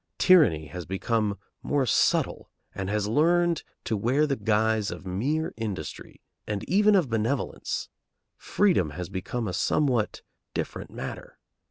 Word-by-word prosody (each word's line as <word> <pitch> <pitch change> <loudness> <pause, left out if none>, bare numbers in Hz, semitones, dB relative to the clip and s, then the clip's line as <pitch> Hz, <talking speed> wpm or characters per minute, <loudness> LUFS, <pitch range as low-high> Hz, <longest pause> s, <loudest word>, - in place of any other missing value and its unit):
Tyranny 150 - +5
has 90 +3 -8
become 105 +2 -1 0.2
more 140 -2 +1
subtle, 110 - +1 0.2
and 95 0 -4
has 105 0 0
learned 170 +7 +3 0.2
to 110 - -1
wear 125 +9 +2
the 140 -2 0
guise 110 -1 +1
of 85 +2 -7
mere 135 - -1
industry, 110 -4 -6 0.3
and 105 -2 -3
even 205 +3 +4
of 180 -7 +3
benevolence. 115 +4 -2 0.5
Freedom 190 - +2
has 90 -1 -5
become 100 +5 -3
a 90 - -3
somewhat 125 - +1 0.3
different - - -4
matter. - - -7
110 Hz, 135 wpm, -27 LUFS, 100-150 Hz, 0.5 s, Tyranny